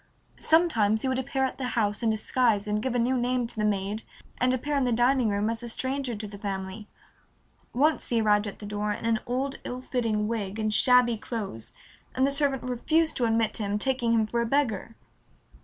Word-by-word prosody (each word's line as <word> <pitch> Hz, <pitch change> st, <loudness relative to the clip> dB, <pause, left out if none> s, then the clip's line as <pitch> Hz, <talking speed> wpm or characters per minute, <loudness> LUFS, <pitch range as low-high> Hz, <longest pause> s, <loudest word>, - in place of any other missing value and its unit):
Sometimes 230 Hz, -11 st, +3 dB
he -, -, 0 dB
would 260 Hz, 0 st, 0 dB
appear 265 Hz, +1 st, -1 dB
at 260 Hz, -, -5 dB
the 255 Hz, -, -2 dB
house 205 Hz, -1 st, +1 dB
in 230 Hz, -, +2 dB
disguise 220 Hz, -1 st, +1 dB
and 210 Hz, 0 st, -1 dB
give 255 Hz, +1 st, -2 dB
a -, -, +3 dB
new 245 Hz, +2 st, +2 dB
name 250 Hz, 0 st, 0 dB
to 230 Hz, -, -5 dB
the 215 Hz, -, -1 dB
maid 205 Hz, +1 st, 0 dB, 0.4 s
and 250 Hz, 0 st, +3 dB
appear 285 Hz, +3 st, -1 dB
in 275 Hz, -, +2 dB
the 250 Hz, -, +1 dB
dining 245 Hz, 0 st, +3 dB
room 205 Hz, +1 st, 0 dB
as 230 Hz, +1 st, -2 dB
a 240 Hz, -, -6 dB
stranger 260 Hz, +1 st, -2 dB
to 210 Hz, +1 st, -6 dB
the 200 Hz, -1 st, -10 dB
family. 195 Hz, +1 st, -5 dB, 0.8 s
Once 300 Hz, +5 st, +1 dB
he 235 Hz, -, +2 dB
arrived 210 Hz, -1 st, +3 dB
at 200 Hz, -, -7 dB
the 210 Hz, -, -9 dB
door 210 Hz, 0 st, -2 dB
in 215 Hz, -, -7 dB
an 230 Hz, -1 st, +2 dB
old, 265 Hz, +3 st, -2 dB
ill 250 Hz, -, -5 dB
fitting 230 Hz, -5 st, -1 dB
wig 210 Hz, -3 st, -3 dB
and 215 Hz, -1 st, -1 dB
shabby 250 Hz, 0 st, +4 dB
clothes 210 Hz, -, -6 dB, 0.4 s
and 260 Hz, -, +3 dB
the 275 Hz, -, +1 dB
servant 275 Hz, -2 st, 0 dB
refused 310 Hz, +6 st, +1 dB
to 245 Hz, -, +1 dB
admit 225 Hz, -1 st, +1 dB
him, 205 Hz, -2 st, -1 dB
taking 245 Hz, 0 st, 0 dB
him 225 Hz, -1 st, +3 dB
for 235 Hz, +2 st, -1 dB
a -, -, 0 dB
beggar. 230 Hz, -5 st, 0 dB
230 Hz, 215 wpm, -27 LUFS, 210-255 Hz, 0.8 s, shabby